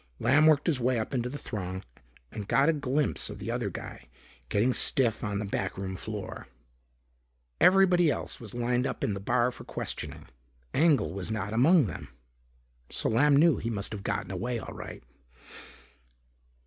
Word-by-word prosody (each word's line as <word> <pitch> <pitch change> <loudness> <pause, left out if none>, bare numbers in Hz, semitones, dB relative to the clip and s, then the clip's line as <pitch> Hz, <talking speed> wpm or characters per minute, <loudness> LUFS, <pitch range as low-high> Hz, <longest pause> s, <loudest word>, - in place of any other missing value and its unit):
Lamb 145 +6 +4
worked 150 -2 +4
his 155 -7 +1
way 125 0 +1
up 110 +4 -3
into 125 -1 -1
the 145 - -5
throng 95 -7 -5 0.5
and 105 -2 -6
got 140 +7 +4
a - - +4
glimpse 145 -1 -1
of - - -7
the - - -4
other - - -1
guy - - -9 0.4
getting 115 - +2
stiff 120 -4 +2
on 105 -2 -2
the 105 - -2
backroom 95 -1 -3
floor. 105 +1 -6 1.1
Everybody 180 -3 +5
else 135 - -3
was 115 -2 -9
lined 120 +2 0
up - - -5
in 105 - 0
the 100 - -4
bar 120 +5 +1
for - - -9
questioning. - - -5 0.5
Engel 150 - +3
was 95 0 -5
not 110 -1 -3
among 145 +6 +5
them. 100 - -6 0.8
So - - -1
Lamb 140 +6 +4
knew 160 -2 +5
he 115 - -3
must 105 -3 -2
have 105 -2 -5
gotten 100 -1 -3
away 120 +6 -2
all 110 - -7
right. - - -9
120 Hz, 170 wpm, -28 LUFS, 105-145 Hz, 1.1 s, Everybody